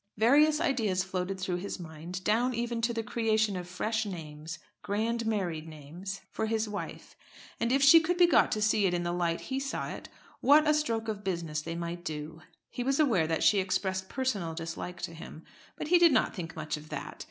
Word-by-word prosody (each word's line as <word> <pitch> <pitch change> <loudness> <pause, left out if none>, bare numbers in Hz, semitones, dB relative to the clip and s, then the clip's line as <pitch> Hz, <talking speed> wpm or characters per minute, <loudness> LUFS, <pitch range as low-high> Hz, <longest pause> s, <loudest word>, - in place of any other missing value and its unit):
Various 295 +7 +5
ideas 225 - +1
floated 185 0 -3
through 185 -1 -1
his 195 +2 -5
mind, 170 +2 -7
down 235 +5 +2
even 235 0 -2
to 235 +1 +1
the 230 -1 -2
creation 220 -2 +1
of 180 -1 -5
fresh 220 +5 -1
names, 160 -4 -7 0.2
grand 225 +3 -1
married 175 -7 -2
names, 165 +6 -8
for 220 - -2
his 220 0 0
wife. 205 -1 -7 0.4
And 235 - 0
if 275 +1 +3
she 280 +4 +9
could 340 +2 -1
be 355 - +7
got 340 - +4
to 215 - 0
see 215 -2 +3
it 180 - 0
in 175 - -1
the 175 - -1
light 170 -1 -1
he 265 0 -3
saw 275 0 -3
it, - - -8 0.3
what 300 +3 +5
a 305 - +5
stroke 230 -7 0
of 210 -2 -4
business 170 -5 -2
they 165 +2 -5
might 170 0 -5
do! 155 0 -6 0.3
He 245 - -3
was 270 +3 +1
aware 225 - +3
that 160 0 0
she 205 - +5
expressed 190 0 -1
personal 205 -12 -2
dislike 170 +2 -6
to 170 - -4
him; 160 0 -10 0.3
but 300 - -5
he 355 0 +6
did 340 -2 +7
not 265 - +2
think 165 -4 -6
much 155 -1 -3
of 150 +1 -12
that. - - -6
195 Hz, 210 wpm, -30 LUFS, 170-235 Hz, 0.4 s, she